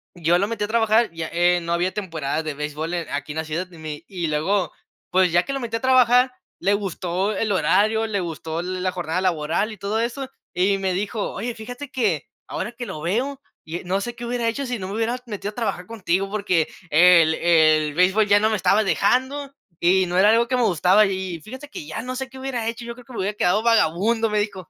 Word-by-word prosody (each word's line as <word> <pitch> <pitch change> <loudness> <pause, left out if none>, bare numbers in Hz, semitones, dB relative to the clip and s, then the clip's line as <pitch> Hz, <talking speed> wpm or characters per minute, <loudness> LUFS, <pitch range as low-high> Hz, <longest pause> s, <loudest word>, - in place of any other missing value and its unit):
yo 170 0 +2
lo 200 +3 0
metí 230 -2 -2
a - - -7
trabajar 225 0 +3
ya, 165 -1 -4
eh, 175 +1 +3
no 170 0 -4
había 175 +2 0
temporada 160 -6 -3
de 155 - -3
béisbol, 150 +3 -4
eh, 175 - 0
en - - -14
aquí 145 +1 -4
en 155 - -6
la 160 - -2
ciudad, 165 +4 -3
y 170 - -13
mi 155 -2 -7
y 175 -4 -3
luego 165 +5 0 0.4
pues 185 -1 +3
ya 175 +1 +4
que 275 - -4
lo 275 - -2
metí 230 -1 -2
a - - -8
trabajar, 255 0 +4 0.3
le 200 - +2
gustó 195 0 -1
el 215 - 0
horario, 215 +3 +2
le 205 -2 -1
gustó 165 -1 -4
la 185 +1 -2
jornada 175 -1 -2
laboral 170 +3 0
y 215 - -9
todo 200 +3 -2
eso, 255 +3 -3 0.2
y 195 +3 +2
me 190 -1 -1
dijo: 205 +3 -2
"Oye, 240 +1 -4
fíjate 245 +5 -8
que, 210 - -1 0.2
ahora 215 +5 -4
que 240 +1 -6
lo 155 - -6
veo, 250 - -1 0.2
y 165 +2 -6
no 190 +2 0
sé 240 +3 -5
qué 240 0 -7
hubiera 240 -1 -1
hecho 275 +5 -3
si 245 -1 -3
no 185 - -5
me 200 - -4
hubiera 230 +2 0
metido 205 -3 -5
a - - -23
trabajar 220 -6 -2
contigo, 195 -3 -1
porque 190 -6 +1 0.2
el 165 0 +6
el 155 -3 +3
béisbol 190 +5 +3
ya 205 0 +5
no 215 - +3
me 215 - +1
estaba 205 +2 +3
dejando 260 +8 0 0.3
y 185 +2 +4
no 175 +1 -1
era 205 +2 +6
algo 235 +1 +3
que 255 - +1
me 250 - +2
gustaba. 185 +2 +4
Y 190 -3 -3
fíjate 260 - -10
que 155 - -8
ya 160 - -4
no 255 +2 -5
sé 265 0 -4
qué 265 - -12
hubiera 255 -4 -3
hecho, 230 +1 -4
yo 235 0 -6
creo 250 0 -15
que 255 - -13
me 225 - -5
hubiera 200 +2 -2
quedado 200 +5 +2
vagabundo", 225 +1 +2
me 210 0 +1
dijo 195 -4 -4
195 Hz, 240 wpm, -23 LUFS, 175-230 Hz, 0.4 s, el